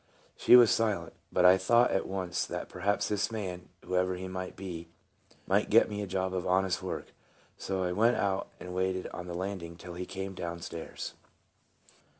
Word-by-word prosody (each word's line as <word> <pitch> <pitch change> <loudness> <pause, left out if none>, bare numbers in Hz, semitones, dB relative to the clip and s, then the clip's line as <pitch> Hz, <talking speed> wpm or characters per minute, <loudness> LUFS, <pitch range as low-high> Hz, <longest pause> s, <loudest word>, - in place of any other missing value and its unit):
She - - +7
was 120 -3 +8
silent, 110 -3 0 0.2
but 90 - +3
I 90 +1 +8
thought 120 +6 +4
at 95 - 0
once 90 -3 -2
that - - -5
perhaps 100 +3 0
this 105 +1 0
man, 95 -5 -5 0.2
whoever 90 0 +1
he 95 +1 -6
might 95 0 -5
be, 85 -3 -6 0.6
might - - +2
get - - +5
me 105 0 -3
a 100 - -3
job 95 0 -1
of 90 -1 -2
honest 95 0 +2
work; - - -5 0.4
so 95 -1 -2
I 90 - 0
went 115 +6 +3
out 95 -1 0
and 90 0 -7
waited 95 0 -1
on 90 - -7
the 85 - -5
landing 90 -2 -4
till 85 +1 -9
he 90 +1 -5
came 95 0 -5
t - - -9
down 85 0 -4
stairs. 85 0 -6
95 Hz, 190 wpm, -30 LUFS, 90-95 Hz, 0.6 s, was